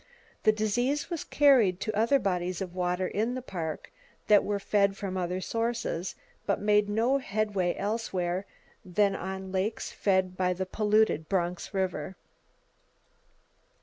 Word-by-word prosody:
The 215 - +5
disease 245 - 0
was 335 - -2
carried 250 -11 +4
to 215 -1 -2
other 230 +6 +4
bodies 180 -5 -1
of 185 -2 -5
water 180 0 0
in 225 +6 -1
the 255 - -4
Park 165 -9 -5 0.4
that 210 -1 +7
were 205 0 -1
fed 200 0 +2
from 190 -2 -4
other 180 0 -1
sources, 225 -5 -2 0.3
but - - +1
made 210 0 +3
no 235 +6 +2
headway 205 -6 -1
elsewhere 195 -3 -2 0.4
than 195 +1 +1
on 190 0 -5
lakes 195 +4 -2
fed 190 -2 +1
by 180 -1 +1
the 190 +1 -3
polluted 210 -5 +1
Bronx 180 -2 -1
River. 190 -3 -2
195 Hz, 140 wpm, -29 LUFS, 185-215 Hz, 0.4 s, that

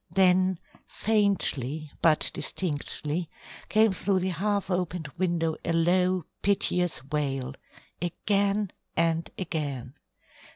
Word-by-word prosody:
Then 185 +1 +4 0.3
faintly, 160 - +1
but 160 -2 +5
distinctly, 155 0 -3 0.4
came 220 0 +4
through 190 0 0
the 185 - 0
half 200 +3 -1
opened 180 -4 -2
window 170 -3 0
a 170 - -1
low 180 +2 +2 0.2
piteous 180 -7 +2
wail 135 -3 -1 0.5
again 200 +3 0 0.3
and 165 0 +1
again. 145 -8 -4
175 Hz, 95 wpm, -27 LUFS, 155-190 Hz, 0.5 s, but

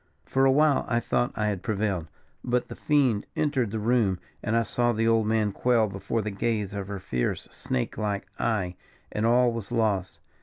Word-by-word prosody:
For 135 0 +2
a 135 - +6
while 150 +1 +4
I 120 - +2
thought 120 +1 0
I 105 - 0
had 100 -4 -1
prevailed; 100 -4 -1 0.4
but 125 0 0
the - - -7
fiend 135 -8 +2
entered 140 -7 +1
the 110 - -3
room, 110 -4 +2 0.2
and 110 +2 0
I 115 - +3
saw 120 +2 +1
the 115 +1 +1
old 115 -1 +3
man 110 -2 +2
quail 120 +2 +2
before 100 +2 -2
the 105 - -3
gaze 105 0 -1
of 100 -1 -4
her 100 0 -4
fierce, 60 -9 -2
snake 65 - -3
like 105 -2 -1
eye, 95 -6 -1 0.3
and 110 +2 0
all 120 +1 +4
was 115 -2 -6
lost. 105 -6 0
110 Hz, 195 wpm, -27 LUFS, 100-120 Hz, 0.4 s, a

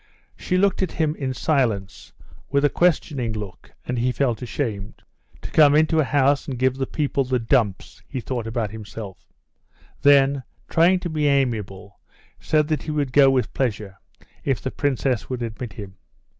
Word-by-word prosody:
She 180 - -1
looked 195 +1 +2
at 185 - -1
him 155 -2 0
in 135 -4 -3
silence, 115 -12 -1 0.4
with 140 0 +2
a 145 - +2
questioning 145 -9 +1
look, 105 -4 -8
and 125 -1 -2
he 125 +2 +1
felt 125 -4 -1
ashamed. 110 -5 -4 0.4
"To - - -7
come 150 -2 +6
into 160 +1 +3
a - - +4
house 140 +1 +2
and 135 -3 -4
give 130 +1 +2
the 135 -1 -2
people 140 -2 -1
the 130 0 0
dumps," 115 - 0
he 130 - -4
thought 120 -2 -4
about 115 -2 -2
himself; 105 -3 -9 0.7
then, 140 -1 +5 0.3
trying 175 +3 +4
to 175 - -4
be 150 -2 0
amiable, 105 -8 -1 0.4
said 150 -1 +1
that 155 -3 0
he - - -8
would 145 -4 -1
go 140 -1 +7
with 130 -2 0
pleasure 105 -6 -3 0.4
if 135 -3 0
the 130 - -4
princess 135 -4 -1
would 125 -2 -3
admit 115 +1 -6
him. 100 -4 -9
130 Hz, 170 wpm, -23 LUFS, 115-145 Hz, 0.7 s, go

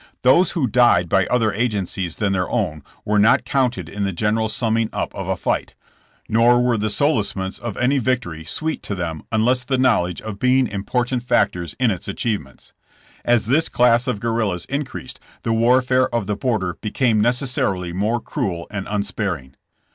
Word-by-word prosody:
Those 135 +9 +4
who 160 -7 +1
died 120 -7 +4
by 95 +1 +2
other 115 -4 +1
agencies 100 -6 -2
than 100 -2 0
their 90 -1 -1
own 75 0 -1 0.2
were 105 0 +2
not 110 +4 +4
counted 125 - 0
in 100 +5 -4
the 100 - 0
general 105 +4 0
summing 115 -1 0
up - - -3
of - - -6
a - - -1
fight, - - -2 0.5
nor 120 +2 +4
were 125 -1 +2
the 110 0 -1
solacements 105 -6 0
of 120 -4 -5
any 135 +3 +2
victory 120 -11 -2
sweet 160 - -2
to 100 - -4
them 85 -4 -4
unless 120 +3 +2
the 130 +1 -1
knowledge 110 -9 +2
of 110 -2 -7
being 130 +2 +3
important 120 +5 -2
factors 90 -7 0
in 125 -3 +3
its 95 - -5
achievements. 100 - -4 0.5
As 120 -2 +2
this 140 +8 +2
class 120 0 +3
of 120 -5 -1
guerrillas 110 -6 -1
increased, 135 -2 -5 0.2
the 115 - 0
warfare 125 +3 +3
of 115 -3 -1
the 105 +1 -2
border 105 -8 -2
became 110 0 +1
necessarily 115 -7 0
more 105 +6 0
cruel 95 - -3
and 100 -2 -5
unsparing. 100 - -3
110 Hz, 170 wpm, -21 LUFS, 100-125 Hz, 0.5 s, Those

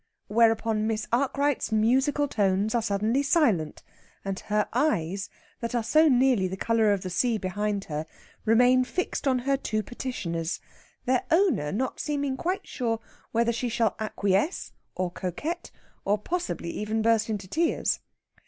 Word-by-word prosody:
Whereupon 225 -1 +3
Miss 215 -1 -1
Arkwright's 280 +1 +1
musical 265 +7 +2
tones 200 -2 +1
are 235 - +2
suddenly 220 +4 +1
silent, 235 - +1 0.4
and 195 -1 -3
her 210 0 0
eyes, 195 - 0 0.3
that 235 +1 -3
are 235 - +1
so 310 +8 +5
nearly 250 -6 +3
the 190 +1 -5
colour 225 0 +2
of 200 -2 +1
the 185 - -4
sea 230 +5 +1
behind 205 +1 -2
her, 155 -1 -4 0.4
remain 245 +3 +5
fixed 290 +3 -2
on 260 -1 +3
her 275 +3 +1
two 215 -5 -2
petitioners, 180 -10 -4 0.5
their 255 0 +2
owner 330 - +2
not 255 +5 -2
seeming 285 -3 -1
quite 365 +8 -2
sure 230 -4 -2 0.3
whether 235 +1 +2
she 240 +1 -2
shall 225 -3 +1
acquiesce, 205 - 0 0.2
or 180 -1 -1
coquette, 290 - -4 0.3
or 205 +1 +2
possibly 335 - -3
even 215 +1 -2
burst 225 -1 +3
into 205 -3 -3
tears. 330 - +1
225 Hz, 150 wpm, -27 LUFS, 200-265 Hz, 0.5 s, so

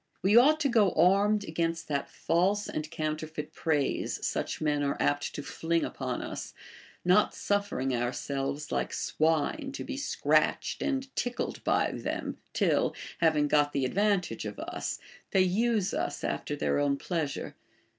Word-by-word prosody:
We 195 +3 +4
ought 290 +6 +7
to 285 - +3
go 220 -7 +3
armed 200 +5 +4
against 165 -1 -2
that 140 -2 -2
false 195 +5 +1
and 155 0 -4
counterfeit 155 -1 -4
praise 150 -4 -1
such - - -2
men 150 -2 +1
are 140 -1 0
apt 145 0 0
to 145 - -4
fling 165 +2 -1
upon 130 -2 -4
us, - - -6 0.5
not 185 +4 +4
suff"ering 200 -10 0
ourselves 135 +4 -2
like - - -1
swine 165 - 0
to - - -5
be 275 -1 -5
scratched 285 - +1
and 270 -2 -2
tickled 245 0 -2
by - - +2
them, - - -4
till, - - +2 0.2
having 155 -3 +3
got 145 0 +3
the 135 -2 +1
ad 130 - -3
vantage 195 - +1
of 105 -1 -5
us, - - -4 0.3
they 190 - +3
use 210 +1 +1
us 145 - -2
after 150 - -2
their 145 - 0
own 140 -1 +2
pleasure. 160 -3 -3
165 Hz, 155 wpm, -29 LUFS, 145-205 Hz, 0.5 s, ought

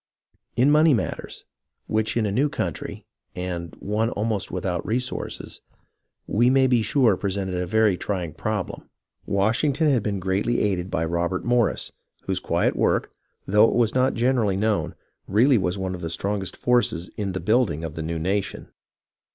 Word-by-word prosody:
In 130 +5 +4
money 150 -1 +5
matters, - - -4 0.4
which 110 +1 0
in 115 - +2
a 100 - -1
new 135 +8 +2
country 90 - -4 0.3
and 85 -3 -5
one 105 +3 0
almost 105 -3 -2
without 90 -1 -2
resources 125 +3 -3 0.6
we 120 +4 +3
may 135 0 +4
be 125 -3 +3
sure 115 -3 +3
presented 95 0 -2
a 90 0 -2
very 110 -2 +3
trying 90 -6 -3
problem, 105 +3 -4 0.4
Washington 135 +10 +2
had 125 -4 +2
been 100 -1 -2
greatly 95 +6 0
aided 95 -3 0
by 80 - -1
Robert 85 +2 -1
Morris, 120 -2 +1 0.3
whose - - -1
quiet - - 0
work, - - +1 0.3
though 105 +3 +5
it - - -1
was 115 -2 +2
not 130 +1 +2
generally 115 -5 +2
known, 105 0 0 0.3
really 120 +5 +4
was 90 0 -1
one 95 -1 -3
of 90 - -6
the 85 - -3
strongest 95 +3 -2
forces 120 -8 +1
in 100 -3 -3
the 95 - -2
build 115 +2 +3
ing 80 +1 -5
of 80 -2 -4
the 80 - -5
new 80 +1 -3
nation. 95 +5 -2
105 Hz, 165 wpm, -24 LUFS, 90-120 Hz, 0.6 s, money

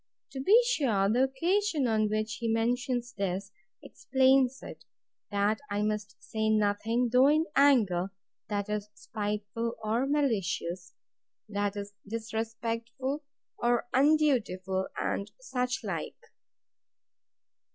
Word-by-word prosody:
To 270 - -6
be 400 - +6
sure, 250 - +2
the 245 +6 +3
occasion 335 +3 +1
on 215 -2 +2
which 215 0 -2
he 235 - -2
mentions 245 +2 0
this, 195 -1 -3 0.3
explains 265 0 +2
it; - - -10 0.5
that 205 +1 +1
I 205 +1 -1
must 210 -1 -2
say 220 0 -2
nothing, 220 +3 +1
though 255 +2 +6
in 310 +2 +3
anger, 205 -10 +4 0.4
that 205 -1 -1
is 210 0 -3
spiteful 210 +2 -3
or 230 +5 0
malicious; 190 - -1 0.5
that 205 -1 -1
is 205 0 -6
disrespectful 230 +5 -3 0.4
or 240 0 +2
undutiful, 245 -11 +2
and 200 - -2
such 250 - -2
like. - - -4
225 Hz, 110 wpm, -29 LUFS, 205-265 Hz, 0.5 s, be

